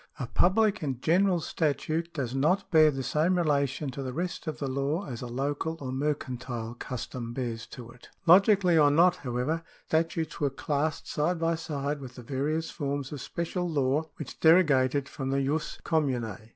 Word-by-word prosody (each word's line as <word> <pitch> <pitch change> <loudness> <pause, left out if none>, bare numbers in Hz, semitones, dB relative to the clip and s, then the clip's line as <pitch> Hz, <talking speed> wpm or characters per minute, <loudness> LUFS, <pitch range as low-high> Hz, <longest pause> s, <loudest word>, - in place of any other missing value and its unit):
A 125 - -2
public 205 - +2
and 135 -5 -2
general 180 +5 +3
statute 160 +2 -1
does 130 -7 -3
not 165 +10 +1
bear 155 -2 +7
the 135 -2 -3
same 160 +8 +1
relation 140 -3 0
to 140 - -6
the 130 -1 -4
rest 175 +2 -4
of 155 - -3
the 140 - -3
law 140 +7 -1
as 120 -4 -6
a 125 - -5
local 145 +6 -2
or 130 -2 -5
mercantile 130 -4 -3
custom 120 -1 -6
bears 120 -3 -4
to 120 -2 -10
it. 125 - -17 0.2
Logically 185 -1 +6
or 145 -1 +6
not, 170 +4 +4
however, 130 +5 -2 0.2
statutes 160 -1 -1
were 145 - +2
classed 145 +2 -2
side 170 +4 0
by 165 0 +1
side 150 -3 -3
with 125 -2 -9
the 125 - -10
various 145 +6 -2
forms 140 -3 -3
of 145 -3 -6
special 175 +1 -3
law 145 +1 0
which 155 - -8
derogated 145 -5 +4
from 135 -1 -5
the 135 0 +1
jus 150 +3 -2
com 160 -3 +2
mtine. 115 -4 -4
145 Hz, 180 wpm, -28 LUFS, 130-165 Hz, 0.2 s, bear